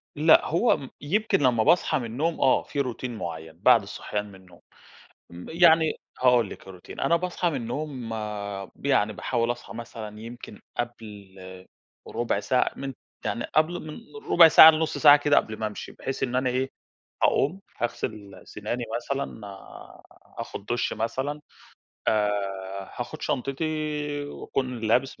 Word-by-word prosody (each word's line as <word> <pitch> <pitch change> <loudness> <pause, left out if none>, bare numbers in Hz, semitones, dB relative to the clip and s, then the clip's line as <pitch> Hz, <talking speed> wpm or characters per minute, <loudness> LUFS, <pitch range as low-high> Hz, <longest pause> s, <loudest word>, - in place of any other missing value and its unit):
لأ، 155 +2 +5
هو 175 +10 +2
م 135 -3 -9
يمكن 210 +10 +1
لمّا 125 -5 +3
باصحى 175 +6 +3
من 120 - -4
النوم 150 +9 -2
آه، 135 - +4
في 145 - -5
روتين 125 -1 -4
معيّن 80 -3 -7
بعد - - +6
الصحيان 105 0 -4
من 100 -2 -13
النوم، 90 -3 -18 0.7
م 85 +1 -10
يعني 160 -1 +5 0.3
هاقول 125 -2 +4
لِك - - -11
الروتين، 90 -2 -10
أنا 155 +5 +3
باصحى 180 0 -1
من 155 - -3
النوم 125 0 -4 0.7
يعني 110 -7 +2
باحاول 115 +5 -1
أصحى - - -11
مثلًا 110 -2 -8
يمكن 115 -2 -10 0.2
قبل 105 -5 -6 0.7
ربع 115 -4 -1
ساعة 125 +5 +1
من 135 0 -5 0.3
يعني 120 - -2
قبل 160 +3 +2
من 150 - -7 0.4
ربع 170 -2 +9
ساعة 160 0 +10
لنص 160 0 -1
ساعة 145 -1 +9
كده 145 0 +2
قبل 110 - +1
ما 110 - -1
أمشي 105 - -7
بحيث 135 - -5
إن 125 -1 0
أنا 130 0 +1
إيه، 130 +2 -1 0.5
هاقوم 170 +8 +2 0.2
هاغسل 105 -4 -4
سناني 115 +4 -4
مثلًا، 135 +1 -4 1.0
آخد 100 - -6
دُش 120 -1 -1
مثلًا، 130 +7 -3 0.7
آآ 105 -1 +3 0.7
هاخد - - -6
شنطتي 150 +1 -2
وأكون 130 -3 -4
لابس 120 +4 +1
125 Hz, 145 wpm, -26 LUFS, 110-150 Hz, 1.0 s, ساعة